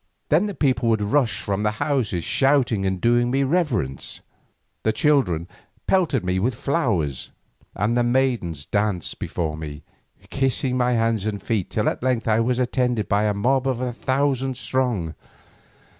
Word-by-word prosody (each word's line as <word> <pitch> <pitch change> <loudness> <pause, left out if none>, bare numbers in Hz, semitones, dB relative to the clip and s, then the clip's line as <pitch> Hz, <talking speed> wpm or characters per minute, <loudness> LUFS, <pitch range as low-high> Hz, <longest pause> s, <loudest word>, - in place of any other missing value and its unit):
Then 170 +8 +3
the 200 - -5
people 125 -5 +1
would 110 -2 +2
rush 115 +2 +1
from 100 0 -2
their 105 0 +1
houses 120 - -1
shouting 130 -8 +2
and 95 -1 -1
doing 120 +3 +3
me 135 +2 +1
reverence, 135 - -1 0.6
the 110 - +2
children 110 - +1 0.4
pelted 165 - +1
me 90 +1 0
with 115 +5 0
flowers, 115 - -1 0.5
and 105 +5 0
the 120 - +3
maidens 120 - 0
danced 100 -4 -1
before 80 -3 -3
me, 75 -1 -7 0.5
kissing 135 -1 0
my 125 -1 +2
hands 115 -3 +1
and 105 -2 -2
feet, 105 -5 -2
till 105 - -1
at - - -1
length 125 -2 0
I 110 0 +3
was 120 +2 +1
attended 125 -3 0
by 105 +1 +2
a 105 - +2
mob 130 +5 +1
a 125 -1 -1
thousand 135 0 0
strong. 115 -8 -1
120 Hz, 160 wpm, -23 LUFS, 100-130 Hz, 0.6 s, Then